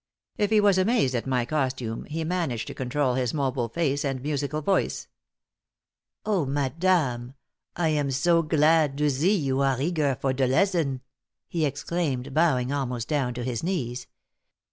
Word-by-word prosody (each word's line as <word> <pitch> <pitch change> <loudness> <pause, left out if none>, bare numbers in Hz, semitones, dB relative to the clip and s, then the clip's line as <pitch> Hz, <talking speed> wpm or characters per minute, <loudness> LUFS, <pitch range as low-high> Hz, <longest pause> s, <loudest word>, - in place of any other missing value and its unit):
If 205 -1 0
he 220 -1 +4
was 200 -2 +4
amazed 190 - +2
at 120 +1 -2
my 125 -2 +1
costume, 130 -5 -2
he 160 +2 -4
managed 160 -9 -2
to - - -7
control 130 +1 -1
his 125 +1 -1
mobile 130 -4 -1
face 145 0 0
and 135 -2 -2
musical 145 +2 -2
voice. 195 +4 0 1.2
"Oh, 200 -6 +1
madame, 140 -2 0 0.4
I 170 -2 +1
am 145 -2 0
zo 165 +6 +3
glad 155 -2 +3
to 150 0 +2
zee 170 +10 +2
you 135 -5 -1
are 135 -2 +1
eager 145 -3 0
for 135 -1 0
de 130 0 +1
lezzon!" 145 -3 +1 0.5
he 165 -3 0
exclaimed, 140 -2 -3
bowing 135 -6 +2
almost 125 -4 -2
down 135 -5 -1
to 120 - -4
his 120 -2 -2
knees. 130 -9 -3
140 Hz, 160 wpm, -26 LUFS, 130-165 Hz, 1.2 s, he